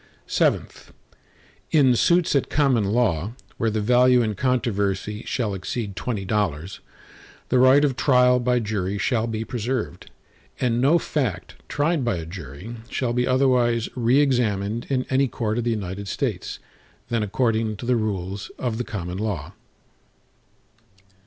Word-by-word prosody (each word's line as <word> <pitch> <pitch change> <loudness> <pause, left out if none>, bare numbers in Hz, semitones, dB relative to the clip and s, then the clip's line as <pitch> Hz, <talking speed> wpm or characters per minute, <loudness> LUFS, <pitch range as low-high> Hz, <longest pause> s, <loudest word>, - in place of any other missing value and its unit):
VII - - +3 1.1
In 135 -5 +4
suits 170 +5 +3
at 140 - +1
common 135 -7 +2
law, 105 -3 0 0.2
where 115 - +1
the 110 0 -1
value 125 +2 +4
in 110 -1 -1
controversy 105 -3 -1
shall 115 -6 -1
exceed 100 +2 -4
twenty 105 -4 -3
dollars, 95 -4 -2 0.7
the 125 - +3
right 130 +3 +6
of 135 -3 0
trial 125 -2 +4
by 125 0 +1
jury 100 -4 -2
shall 115 +2 0
be 110 -1 -3
preserved, 120 +1 -3 0.5
and 120 -2 +1
no 145 +6 +5
fact 125 - -2 0.2
tried 150 0 +1
by 120 -5 0
a 80 - -5
jury 85 - -8
shall 120 -3 -1
be 125 0 +1
otherwise 125 -3 +2
re 125 +2 +3
examined 115 -5 0
in 130 -2 0
any 135 +1 +3
court 115 -2 -2
of 120 - -2
the - - +1
United 100 -2 -3
States, - - -3 0.5
than 115 -1 0
according 110 +1 0
to 120 - -7
the 125 +1 +2
rules 100 -3 -3
of 120 -3 -2
the - - 0
common 95 -6 -5
law. 105 -7 -3
115 Hz, 145 wpm, -23 LUFS, 100-125 Hz, 1.1 s, right